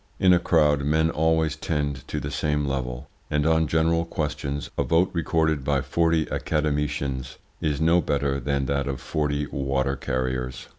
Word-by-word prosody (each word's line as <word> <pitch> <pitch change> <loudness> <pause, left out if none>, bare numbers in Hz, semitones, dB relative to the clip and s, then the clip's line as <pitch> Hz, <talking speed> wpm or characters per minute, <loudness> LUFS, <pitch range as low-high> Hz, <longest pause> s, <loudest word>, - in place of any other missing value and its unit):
In 95 -1 +6
a 90 - +5
crowd 75 -4 +3
men 80 +3 +2
always 80 -1 +1
tend 75 -4 -3
to - - -3
the 70 - -5
same 75 0 0
level, 65 -1 -3 0.2
and, 75 0 +1
on 80 0 +3
general 80 +2 +2
questions, 75 -3 -3
a - - 0
vote, 85 +3 +2
recorded 80 -4 +1
by 70 -1 +1
forty 80 +4 +1
academicians 70 -3 -1 0.2
is 75 -2 0
no 85 +2 +4
better 70 -2 0
than 70 -1 -1
that 70 0 -1
of 65 -2 -3
forty 75 -1 -1
water 70 0 0
carriers. 65 0 -3
75 Hz, 160 wpm, -25 LUFS, 70-80 Hz, 0.2 s, In